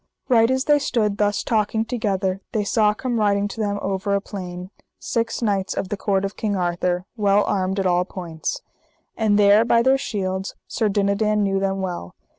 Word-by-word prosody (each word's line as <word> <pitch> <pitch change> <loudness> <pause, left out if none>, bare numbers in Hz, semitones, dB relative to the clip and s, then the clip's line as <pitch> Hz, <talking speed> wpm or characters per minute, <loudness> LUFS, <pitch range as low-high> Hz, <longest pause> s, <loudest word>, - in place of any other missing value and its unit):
Right 230 -2 +5
as 260 0 +1
they 295 0 +4
stood 215 -6 0
thus 205 -1 +1
talking 220 0 0
together 195 -5 -1
they 215 - +1
saw 210 0 +2
come 240 0 -2
riding 205 -1 +2
to 225 - -8
them 205 -1 -1
over 195 +1 -1
a - - +2
plain 180 -2 -7 0.3
six 230 +1 -2
knights 200 -3 0
of 185 - -3
the - - -1
court 195 -1 0
of 195 - -5
King 210 -2 -1
Arthur, 180 0 -1
well 205 -2 +3
armed 190 0 -1
at 195 - -1
all 180 -1 +3
points. 170 -4 -5 0.5
And 215 -2 +2
there 205 +1 +6
by 230 0 +3
their 265 +2 +4
shields 190 -5 -3
Sir 220 - 0
Dinadan 205 +1 +1
knew 195 -1 +1
them 195 0 -1
well. 175 - -5
200 Hz, 190 wpm, -22 LUFS, 190-220 Hz, 0.5 s, there